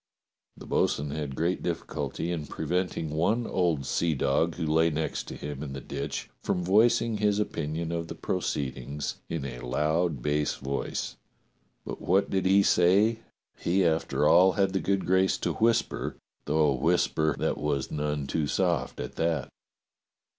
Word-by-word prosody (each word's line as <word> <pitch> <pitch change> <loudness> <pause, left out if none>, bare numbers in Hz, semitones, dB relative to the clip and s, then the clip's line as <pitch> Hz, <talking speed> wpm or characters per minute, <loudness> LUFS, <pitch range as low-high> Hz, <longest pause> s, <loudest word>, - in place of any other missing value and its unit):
^ - - -14
The - - -10
bo'sun 70 0 0
had 75 -2 -4
great 85 +5 0
difficulty 85 - -3
in 80 -4 -3
preventing 90 -3 -2
one 105 +10 +1
old 85 -8 +1
seadog 80 +2 +1
who 85 - -3
lay 80 +2 +3
next 80 0 -3
him 70 -1 -6
in 70 -3 -5
the 70 - -5
ditch - - -5
from 90 - -1
voicing 115 +4 +3
his 105 -1 +2
opinion 80 -4 -2
of 85 -1 -2
the - - -7
proceedings 70 +1 -3
in 80 -5 -3
a - - -6
loud 75 +3 0
bass 75 0 0
voice, 70 +1 -3 0.7
but - - -6
what 95 +2 +2
he 95 - +2
did 95 +2 +4
say 100 +6 +4 0.4
he 90 +2 +2
after 80 -2 +1
all 95 +4 +6
had 95 -2 +1
the 95 - +1
good 100 0 0
grace 95 +1 +3
to - - -1
whis 115 +1 +3
per, - - -5 0.3
though 75 0 +3
a - - +2
whisper 75 +3 +1
that - - -1
was 70 -3 -1
none 75 -1 -2
too 75 +2 -1
soft - - 0
at - - -6
that. 80 -5 0
80 Hz, 160 wpm, -28 LUFS, 75-95 Hz, 0.7 s, all